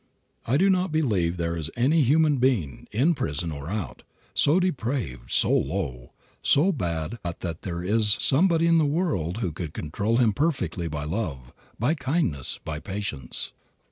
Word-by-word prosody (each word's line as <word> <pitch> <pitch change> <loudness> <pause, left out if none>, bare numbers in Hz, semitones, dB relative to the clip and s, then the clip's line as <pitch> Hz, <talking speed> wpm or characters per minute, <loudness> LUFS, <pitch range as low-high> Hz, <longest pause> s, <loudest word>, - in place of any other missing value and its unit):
I 130 +4 +3
do 190 +5 +4
not 185 -1 +1
believe 100 - +1
there 85 0 -1
is 80 -2 -4
any 145 +7 +3
human 150 +2 +4
being, 115 - 0
in 135 +11 +3
prison 80 - -2
or 70 +1 -6
out, 105 -2 -4 0.3
so 155 +6 +4
depraved, 125 - -2
so - - +4
low, 65 -10 -1 0.3
so 160 +8 +4
bad 85 - -3
but 85 -3 -5
that 85 -3 -4
there 85 -2 -4
is 105 +2 +2
somebody 165 +3 +3
in 165 -1 +5
the 155 - +3
world 115 - -1
who 85 - -2
could 80 -1 -6
control 100 +9 -1
him 115 -4 +3
perfectly 95 - -1
by 75 -2 -4
love, 75 - -4 0.2
by 125 +8 +2
kindness, 135 - -1
by 75 -1 -4
patience. 95 -10 -3
105 Hz, 165 wpm, -26 LUFS, -, 0.3 s, in